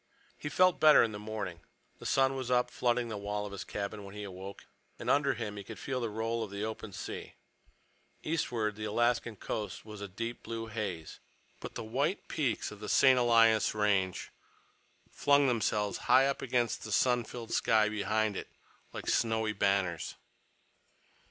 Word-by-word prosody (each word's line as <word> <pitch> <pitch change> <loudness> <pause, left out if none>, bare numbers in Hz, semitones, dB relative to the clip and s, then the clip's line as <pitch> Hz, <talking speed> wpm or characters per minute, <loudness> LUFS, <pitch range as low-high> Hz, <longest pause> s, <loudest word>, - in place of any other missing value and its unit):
He 145 - -5
felt 185 +4 +4
better 155 -1 +8
in 115 - 0
the 105 - -6
morning. 105 -5 -5 0.4
The - - -5
sun 135 0 +3
was 130 -2 -4
up, 125 0 +2
flooding 120 -1 0
the 105 -2 -4
wall 105 +1 -3
of 105 - -7
his 100 - -5
cabin, 100 0 -5
when 100 +1 -10
he 105 - -5
awoke, 95 0 -8 0.3
and - - -1
under 140 -1 +3
him 105 -3 -5
he 100 - -6
could - - -9
feel 130 -2 -3
the 115 - -1
roll 115 +2 -2
of 110 - -6
the 100 +1 -4
open 110 -1 -6
sea. - - -7 0.9
Eastward 120 -10 -1
the 110 0 -5
Alaskan 120 +1 +1
coast 105 0 -5
was 105 -2 -9
a 100 - -4
deep 115 +5 -5
blue 115 0 -5
haze, 100 -8 -5 0.4
but - - -8
the - - -4
white 140 - -1
peaks 130 -10 -1
of 105 - -10
the 105 - -6
St. 130 -2 +6
Elias 115 -3 +4
Range 100 -3 +1 0.8
flung 140 0 +4
themselves 105 -4 0
high 135 +1 +7
up 140 0 -1
against 120 -2 0
the 110 - -6
sun 125 +3 +3
filled 115 0 -8
sky 110 -1 +3
behind 105 0 0
it, - - -5 0.5
like - - -6
snowy 110 -1 +1
banners. 100 -4 0
110 Hz, 175 wpm, -31 LUFS, 105-120 Hz, 0.9 s, better